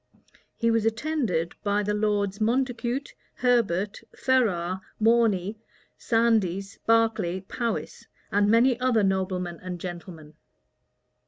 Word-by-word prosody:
He 230 Hz, -1 st, +1 dB
was 225 Hz, -1 st, +2 dB
attended 225 Hz, -, -1 dB
by 205 Hz, 0 st, +1 dB
the 210 Hz, +1 st, -1 dB
lords 205 Hz, -1 st, 0 dB
Montacute, 245 Hz, +3 st, -1 dB, 0.2 s
Herbert, 210 Hz, -6 st, +1 dB
Ferrars, 190 Hz, -9 st, +1 dB, 0.2 s
Morney, 220 Hz, -3 st, +2 dB, 0.4 s
Sandys, 205 Hz, -5 st, 0 dB
Berkeley, 225 Hz, -5 st, +2 dB
Powis, 230 Hz, +4 st, -4 dB, 0.2 s
and 205 Hz, 0 st, +3 dB
many 240 Hz, +2 st, +4 dB
other 250 Hz, -4 st, +2 dB
noblemen 185 Hz, -3 st, -1 dB
and 180 Hz, -1 st, -5 dB
gentlemen. 170 Hz, -3 st, -8 dB
210 Hz, 100 wpm, -26 LUFS, 185-235 Hz, 0.4 s, many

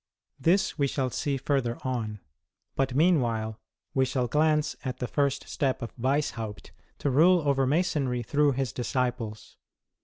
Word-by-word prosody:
This 180 Hz, +5 st, +2 dB
we 140 Hz, -, +3 dB
shall 130 Hz, -2 st, -1 dB
see 140 Hz, +2 st, -1 dB
further 130 Hz, -3 st, 0 dB
on; 110 Hz, -5 st, -3 dB, 0.5 s
but, 135 Hz, -2 st, 0 dB
meanwhile, 120 Hz, -9 st, +2 dB, 0.3 s
we 130 Hz, -, +3 dB
shall 130 Hz, -1 st, 0 dB
glance 150 Hz, +3 st, +2 dB
at 130 Hz, -3 st, -3 dB
the 125 Hz, -, -3 dB
first 140 Hz, +1 st, 0 dB
step 135 Hz, -2 st, -1 dB
of 115 Hz, -, -7 dB
Weishaupt 115 Hz, -5 st, -2 dB, 0.3 s
to 140 Hz, -, -1 dB
rule 165 Hz, +3 st, +5 dB
over 135 Hz, -2 st, +2 dB
Masonry 140 Hz, -5 st, +1 dB
through 145 Hz, +3 st, +2 dB
his 130 Hz, -2 st, -2 dB
disciples. 120 Hz, -3 st, -3 dB
135 Hz, 145 wpm, -28 LUFS, 120-145 Hz, 0.5 s, rule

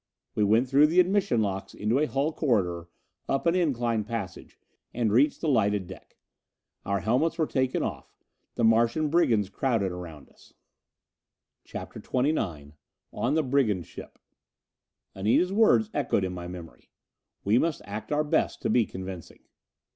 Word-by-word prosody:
We 105 Hz, -, +1 dB
went 110 Hz, +5 st, +3 dB
through 140 Hz, +3 st, +5 dB
the 170 Hz, +4 st, +2 dB
admission 185 Hz, -, +2 dB
locks 95 Hz, -1 st, -4 dB
into 110 Hz, +6 st, 0 dB
a 155 Hz, -, +1 dB
hull 145 Hz, +3 st, -1 dB
corridor, 90 Hz, -, 0 dB, 0.4 s
up 135 Hz, -, 0 dB
an 170 Hz, -, +3 dB
incline 120 Hz, -11 st, 0 dB
passage, 105 Hz, -4 st, -6 dB, 0.4 s
and 115 Hz, -3 st, 0 dB
reached 140 Hz, +6 st, +3 dB
the 165 Hz, -, -1 dB
lighted 105 Hz, -7 st, +2 dB
deck. -, -, -13 dB, 0.7 s
Our 100 Hz, -1 st, -1 dB
helmets 125 Hz, -, +1 dB
were 160 Hz, -, +2 dB
taken 130 Hz, -3 st, -1 dB
off. -, -, -5 dB, 0.4 s
The 120 Hz, -, -1 dB
Martian 115 Hz, +7 st, +3 dB
brigands 115 Hz, -, +3 dB
crowded 115 Hz, -6 st, 0 dB
around 85 Hz, -5 st, -9 dB
us. -, -, -22 dB, 1.1 s
CHAPTER -, -, -8 dB
XXIX 100 Hz, -, -2 dB, 0.4 s
On 130 Hz, +6 st, 0 dB
the 160 Hz, -, +2 dB
Brigand 125 Hz, -, +1 dB
Ship -, -, -11 dB, 1.0 s
Anita's 110 Hz, -, +1 dB
words 220 Hz, 0 st, +4 dB
echoed 130 Hz, -8 st, 0 dB
in 95 Hz, -1 st, -2 dB
my 90 Hz, -1 st, -6 dB
memory: 90 Hz, -2 st, -11 dB, 0.5 s
"We 105 Hz, +5 st, +3 dB
must 165 Hz, 0 st, -1 dB
act 105 Hz, +6 st, -7 dB
our 150 Hz, +1 st, +2 dB
best 150 Hz, -, 0 dB
to -, -, +1 dB
be 115 Hz, -4 st, +3 dB
convincing." 95 Hz, -2 st, -9 dB
115 Hz, 150 wpm, -27 LUFS, 100-150 Hz, 1.1 s, through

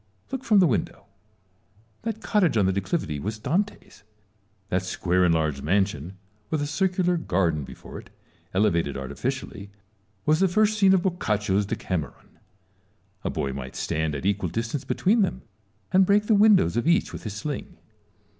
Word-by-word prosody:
Look 265 Hz, -1 st, -4 dB
from 220 Hz, -5 st, +4 dB
the 190 Hz, -, +6 dB
window. 120 Hz, -10 st, -1 dB, 1.0 s
That 225 Hz, -1 st, -4 dB
cottage 190 Hz, -, +2 dB
on 100 Hz, -, +3 dB
the 95 Hz, -, +2 dB
declivity 95 Hz, -, -2 dB
was 105 Hz, +7 st, -4 dB
Dante's: 175 Hz, -, -3 dB, 0.7 s
that 90 Hz, -, +1 dB
square 90 Hz, 0 st, 0 dB
and 90 Hz, -, +4 dB
large 75 Hz, -4 st, 0 dB
mansion, 95 Hz, 0 st, -1 dB, 0.3 s
with 155 Hz, -, 0 dB
a 145 Hz, -, -1 dB
circular 180 Hz, +3 st, +1 dB
garden 85 Hz, -, 0 dB
before -, -, -10 dB
it -, -, -15 dB, 0.4 s
elevated 85 Hz, -8 st, +1 dB
artificially, 85 Hz, +8 st, -5 dB, 0.6 s
was 155 Hz, +1 st, +3 dB
the 190 Hz, -, +4 dB
first 215 Hz, +4 st, +2 dB
scene 190 Hz, -1 st, +6 dB
of 180 Hz, -, +1 dB
Boccaccio's 105 Hz, -, 0 dB
Decameron. 90 Hz, -6 st, -5 dB, 0.8 s
A -, -, -1 dB
boy 70 Hz, -1 st, -2 dB
might 65 Hz, -1 st, -7 dB
stand 80 Hz, -1 st, -1 dB
at 70 Hz, -, -5 dB
an -, -, 0 dB
equal 100 Hz, -3 st, 0 dB
distance 115 Hz, -, -3 dB
between 200 Hz, -, +2 dB
them, 190 Hz, -, -1 dB, 0.5 s
and 190 Hz, +1 st, +6 dB
break 205 Hz, +2 st, +3 dB
the 220 Hz, -, +3 dB
windows 205 Hz, -, +5 dB
of 120 Hz, +5 st, 0 dB
each 170 Hz, +1 st, +2 dB
with -, -, -6 dB
his 110 Hz, -, -5 dB
sling. 155 Hz, -, -5 dB
110 Hz, 165 wpm, -25 LUFS, -, 1.0 s, the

